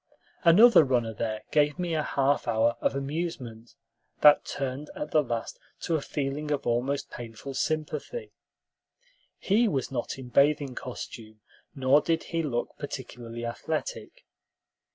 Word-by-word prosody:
Another 195 +4 +8
runner 120 -5 0
there 110 -1 -3
gave 150 0 +3
me 175 -2 -2
a 155 - +1
half 140 -1 +1
hour 115 +1 +2
of - - +1
amusement 135 -6 -4 0.5
that 150 0 +7
turned 140 +1 -4
at 150 - -5
the 155 - +4
last 120 -4 -4 0.2
to 170 - -2
a 155 - +1
feeling 145 +1 -3
of 145 -2 -1
almost 125 +4 -1
painful 120 +3 -8
sympathy. 155 - -3 1.1
He 220 +4 +2
was 135 - -1
not 125 -1 -3
in 130 -2 -9
bathing 140 0 +3
costume, 110 -3 -8 0.3
nor 135 +2 +4
did 165 +1 0
he 165 - +1
look 125 -7 -2
particularly 120 -4 -6
athletic. - - -4
140 Hz, 135 wpm, -28 LUFS, 120-155 Hz, 1.1 s, Another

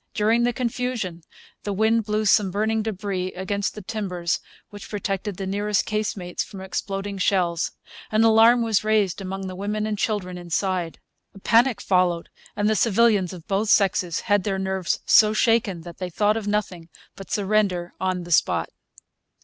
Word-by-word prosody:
During 220 +3 +2
the 240 +1 +2
confusion 240 -7 -3 0.4
the 205 - -3
wind 220 +2 +2
blew 215 0 -1
some 205 -1 +4
burning 220 +3 0
debris 190 -3 -3
against 200 +2 -3
the 210 - -8
timbers 180 -5 -2 0.3
which 205 -1 -10
protected 200 -1 -3
the 195 - -4
nearest 205 +1 0
casemates 205 -4 -2
from 195 - -11
exploding 195 +1 -4
shells. 175 -3 +1 0.4
An 215 +1 +3
alarm 225 +2 +6
was 220 -3 +1
raised 210 -3 +1
among 195 0 -5
the 185 -1 -6
women 210 +3 -2
and 215 -1 -3
children 185 -5 -2
inside. 175 0 -2 0.4
A - - -11
panic 230 +3 +3
followed; 180 -3 +1 0.3
and 205 - 0
the 220 - +2
civilians 215 -4 +3
of 175 -4 -11
both 205 +2 0
sexes 190 -4 +2
had 205 -3 +1
their 195 -1 -1
nerves 190 -2 -1
so 215 -1 +6
shaken 215 -6 +1
that 170 +1 -11
they 185 -1 -3
thought 210 +4 +1
of 220 -2 -4
nothing 190 -5 -2 0.3
but 195 - -11
surrender 195 -4 0
on 185 -1 -1
the 175 - -9
spot. - - +2
200 Hz, 165 wpm, -23 LUFS, 185-215 Hz, 0.4 s, alarm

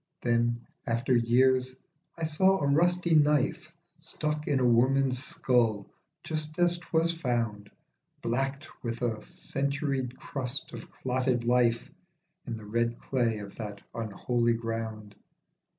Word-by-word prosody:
Then, 120 0 +1 0.2
after 120 +3 +1
years, 130 +2 +3 0.4
I 165 - -5
saw 190 +5 +3
a 140 - 0
rusty 170 +4 +3
knife 150 0 +3 0.3
Stuck 150 -1 -3
in 140 -3 +2
a 125 - +2
woman's 130 +2 +3
skull, 115 -8 +1 0.3
just 155 -1 -4
as 175 0 +2
'twas 165 0 +1
found, 115 -9 -2 0.5
Blackt 135 +5 -1 0.2
with 115 0 -3
a 110 -3 -1
centuried 135 0 -2
crust 140 +3 -5
of - - -8
clotted 125 -1 0
life, 120 -1 +2 0.6
In 115 -2 -3
the 110 - -10
red 115 +2 0
clay 120 -4 0
of 100 -1 -8
that 105 -2 -6
unholy 115 +2 0
ground. 115 -2 -4
125 Hz, 125 wpm, -29 LUFS, 115-145 Hz, 0.6 s, years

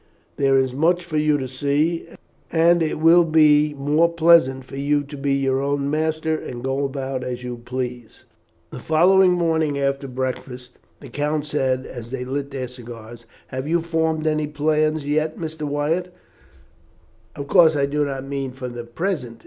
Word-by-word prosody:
There 135 -1 +3
is 130 -1 +1
much 170 +5 +1
for 160 -3 -3
you 150 -1 +2
to 130 -2 -4
see, 145 +6 -1 0.4
and 170 +1 +4
it 160 -1 -1
will 165 +3 +6
be 150 -2 +4
more 150 +4 +2
pleasant 160 -6 +4
for 130 - -10
you 145 +1 +1
to 145 +1 -10
be 140 0 -1
your 135 -1 +1
own 140 0 -1
master 160 +1 0
and 125 -5 -7
go 135 +1 -1
about 135 -1 -3
as 125 -1 -5
you 125 -1 -5
please." 125 -1 -6 0.5
The - - -7
following 180 +3 +4
morning, 160 -4 0
after 140 0 -1
breakfast, 125 -1 -5 0.2
the 140 - -11
count 150 +3 -2
said, 130 -3 -1
as 120 -2 -9
they 125 0 -4
lit 140 +2 -3
their 135 -2 -4
cigars, 120 -2 -11 0.2
"Have 130 +2 -5
you 170 +2 +2
formed 160 -1 -1
any 155 -1 0
plans 155 0 0
yet, 155 +1 0
Mr. 160 -2 -5
Wyatt? 155 +5 -1 1.2
Of 140 - -6
course 160 -1 +5
I 140 -1 +2
do 145 +1 0
not 135 -2 -4
mean 135 -2 -4
for 130 -1 -6
the 120 -1 -7
present. 125 -3 -4
145 Hz, 175 wpm, -22 LUFS, 130-155 Hz, 1.2 s, will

